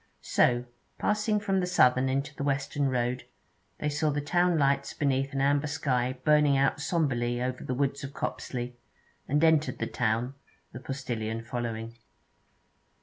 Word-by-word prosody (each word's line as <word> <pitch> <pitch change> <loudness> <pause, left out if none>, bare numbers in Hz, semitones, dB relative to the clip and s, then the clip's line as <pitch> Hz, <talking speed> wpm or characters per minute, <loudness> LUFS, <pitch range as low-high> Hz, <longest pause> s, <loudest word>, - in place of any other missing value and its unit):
So 120 0 +2 0.3
passing 210 0 +1
from 195 -2 0
the 180 - 0
southern 130 -6 +4
into 140 +2 -1
the 140 - -4
western 140 0 0
road, 125 0 -1 0.5
they 150 - -1
saw 150 +1 0
the 145 0 0
town 175 +3 +2
lights 140 -1 +1
beneath 135 -2 0
an 135 - -1
amber 145 +1 +2
sky 130 -4 -1
burning 150 -2 +5
out 135 0 +2
sombrely 120 -7 0
over 125 +1 -3
the 125 - -2
woods 140 +1 -1
of 140 - -5
Copsley, 125 -3 -4 0.5
and 150 +3 +1
entered 160 -1 +3
the - - -2
town, 120 +2 -1 0.4
the 120 - -8
postillion 115 -5 -4
following. 115 -1 -5
135 Hz, 150 wpm, -28 LUFS, 125-150 Hz, 0.5 s, burning